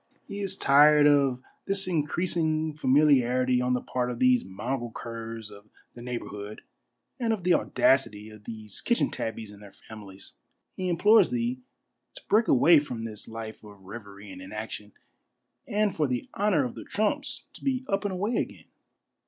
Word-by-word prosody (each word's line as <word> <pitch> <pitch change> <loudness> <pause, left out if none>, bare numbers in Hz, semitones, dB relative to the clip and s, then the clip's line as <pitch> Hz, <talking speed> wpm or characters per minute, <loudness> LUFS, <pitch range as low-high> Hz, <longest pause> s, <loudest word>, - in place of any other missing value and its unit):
He 200 - -6
is 195 -1 -3
tired 145 +2 +6
of 140 -3 +3 0.2
this 195 -1 +1
increasing 160 -1 0
familiarity 130 -4 +3
on 125 0 +1
the 125 - -2
part 125 -1 -2
of 120 - -4
these 125 0 +4
mongrel 120 +6 -4
curs 115 -2 -7
of 100 +1 -15 0.2
the 120 - -11
neighborhood 105 -4 -6 0.6
and 235 -2 0
of 215 -5 -2
the 180 0 +4
audacity 110 -10 +1
of 105 -1 -15
these 110 -3 -7
kitchen 235 - +1
tabbies 110 -2 -5
and 100 0 -14
their 100 -1 -12
families. 100 -2 -12 0.4
He 185 -1 -2
implores 210 +6 +5
thee 245 +1 -2 0.5
to - - -9
break 220 +2 +3
away 160 +5 +6
from 125 -6 -5
this 110 -2 -7
life 110 -1 -8
of 100 -2 -14
revery 100 0 -10
and 95 0 -10
inaction, 105 +1 -7 0.7
and 210 -2 0
for 150 -2 +1
the 125 -2 -3
honor 190 -9 +2
of 125 - -5
the - - -9
Trumps 280 +8 -2
to - - -13
be 260 -2 -1
up 195 +1 0
and 205 - -1
away 205 +6 -1
again." - - -4
130 Hz, 170 wpm, -27 LUFS, 110-180 Hz, 0.7 s, tired